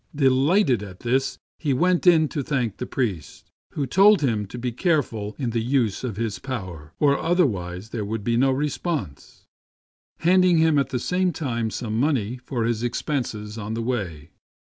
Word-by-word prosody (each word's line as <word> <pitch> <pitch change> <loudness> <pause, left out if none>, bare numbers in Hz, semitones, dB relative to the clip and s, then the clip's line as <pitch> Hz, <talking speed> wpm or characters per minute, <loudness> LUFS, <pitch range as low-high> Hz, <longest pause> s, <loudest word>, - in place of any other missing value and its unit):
Delighted 135 - +3
at 95 -3 -10
this, 130 +3 0 0.2
he 145 -4 0
went 180 +5 +2
in 160 -3 +6
to 145 - -3
thank 125 -7 -2
the 125 - -5
priest, 95 - -4 0.2
who 145 - -1
told 200 +5 +5
him 110 -6 0
to 120 - -8
be 125 0 -2
careful 115 - -1
in 125 -4 -2
the 115 0 0
use 120 -3 0
of 115 -6 -4
his 110 -3 -2
power, 90 - -6
or 140 -2 +3
otherwise 105 - 0
there 110 -2 -3
would 105 +1 -4
be 115 +2 +1
no 135 +3 +3
response, 135 - -3 0.8
handing 180 0 +4
him 160 -2 +4
at 135 -2 0
the 130 - -1
same 180 +8 0
time 120 -9 -2
some 110 0 -3
money 125 -5 0
for 125 -2 -2
his 115 -1 0
expenses 120 -4 -3
on 110 +1 -4
the 115 - -3
way. 90 -11 -4
125 Hz, 175 wpm, -24 LUFS, 110-145 Hz, 0.8 s, in